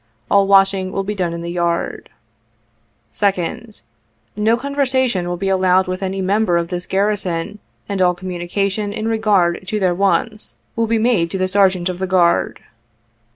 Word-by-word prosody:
All 200 Hz, -1 st, +4 dB
washing 195 Hz, -1 st, +3 dB
will 195 Hz, -, -2 dB
be 205 Hz, +2 st, -3 dB
done 180 Hz, -4 st, -2 dB
in 170 Hz, 0 st, -5 dB
the 170 Hz, -, -4 dB
yard. 170 Hz, -1 st, -2 dB, 0.5 s
" 115 Hz, -1 st, -43 dB
2d. 205 Hz, -, -2 dB, 0.3 s
— 115 Hz, 0 st, -44 dB
No 230 Hz, +1 st, +4 dB
conversation 260 Hz, -7 st, 0 dB
will 175 Hz, -, -3 dB
be 195 Hz, -, -3 dB
allowed 185 Hz, 0 st, +3 dB
with 185 Hz, +1 st, -4 dB
any 190 Hz, 0 st, -2 dB
member 195 Hz, -2 st, +2 dB
of 170 Hz, 0 st, -2 dB
this 180 Hz, -1 st, -4 dB
garrison, 195 Hz, -2 st, -1 dB, 0.3 s
and 200 Hz, -2 st, -2 dB
all 180 Hz, -1 st, +3 dB
communication 190 Hz, +3 st, -3 dB
in 215 Hz, +1 st, -3 dB
regard 205 Hz, -7 st, +1 dB
to 210 Hz, +2 st, -1 dB
their 185 Hz, -3 st, +2 dB
wants 200 Hz, +3 st, 0 dB, 0.2 s
will 230 Hz, 0 st, 0 dB
be 230 Hz, +1 st, +1 dB
made 220 Hz, -7 st, +2 dB
to 190 Hz, -, -3 dB
the 185 Hz, 0 st, 0 dB
Sergeant 190 Hz, -2 st, +2 dB
of 180 Hz, -1 st, -4 dB
the 190 Hz, -, -2 dB
Guard. 180 Hz, -2 st, +2 dB
190 Hz, 175 wpm, -18 LUFS, 175-210 Hz, 0.5 s, All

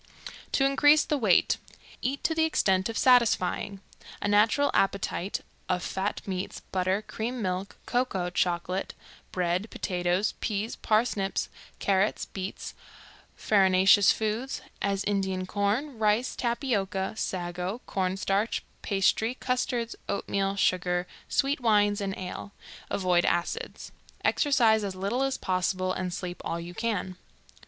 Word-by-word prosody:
To 270 Hz, -, +3 dB
increase 290 Hz, +3 st, +5 dB
the 300 Hz, -, 0 dB
weight: 205 Hz, -7 st, +4 dB, 0.4 s
Eat 270 Hz, +3 st, -2 dB
to 320 Hz, -, +2 dB
the 320 Hz, 0 st, +2 dB
extent 190 Hz, -11 st, +2 dB
of 225 Hz, -, -4 dB
satisfying; 210 Hz, -5 st, +3 dB, 0.4 s
a -, -, -2 dB
natural 220 Hz, +8 st, +4 dB
appetite, 195 Hz, -1 st, 0 dB, 0.3 s
of 180 Hz, -1 st, 0 dB
fat 195 Hz, +2 st, -2 dB
meats, 185 Hz, -1 st, -4 dB
butter, 190 Hz, +2 st, 0 dB
cream, 240 Hz, +4 st, -4 dB
milk, 190 Hz, -1 st, -3 dB
cocoa, 195 Hz, -8 st, 0 dB
chocolate, 180 Hz, +2 st, -1 dB, 0.4 s
bread, 180 Hz, +3 st, -1 dB
potatoes, 180 Hz, +1 st, 0 dB
peas, 215 Hz, +1 st, -2 dB
parsnips, 215 Hz, -3 st, 0 dB, 0.3 s
carrots, 195 Hz, +1 st, +1 dB
beets, 190 Hz, 0 st, -6 dB, 0.6 s
farinaceous 190 Hz, -1 st, +5 dB
foods, 220 Hz, +5 st, -2 dB, 0.2 s
as 200 Hz, 0 st, 0 dB
Indian 190 Hz, -2 st, -1 dB
corn, 215 Hz, +7 st, -1 dB
rice, 215 Hz, +3 st, +2 dB
tapioca, 205 Hz, -6 st, -1 dB
sago, 180 Hz, +3 st, -3 dB
corn 190 Hz, -1 st, -1 dB
starch, 200 Hz, +3 st, 0 dB, 0.2 s
pastry, 220 Hz, +4 st, +1 dB
custards, 245 Hz, -2 st, -1 dB
oatmeal, 195 Hz, 0 st, -1 dB
sugar, 180 Hz, -2 st, +1 dB, 0.2 s
sweet 280 Hz, +2 st, +1 dB
wines, 205 Hz, -3 st, +3 dB
and 195 Hz, -1 st, -3 dB
ale. 190 Hz, +2 st, -6 dB, 0.4 s
Avoid 180 Hz, -3 st, +2 dB
acids. 175 Hz, -, -2 dB, 0.3 s
Exercise 230 Hz, -7 st, +3 dB
as 195 Hz, -2 st, -3 dB
little 200 Hz, +7 st, -1 dB
as 270 Hz, 0 st, 0 dB
possible, 185 Hz, 0 st, 0 dB
and 185 Hz, -1 st, -3 dB
sleep 180 Hz, 0 st, -5 dB
all 170 Hz, -, -2 dB
you 170 Hz, +1 st, -7 dB
can. 195 Hz, -3 st, -2 dB
200 Hz, 125 wpm, -28 LUFS, 185-230 Hz, 0.6 s, increase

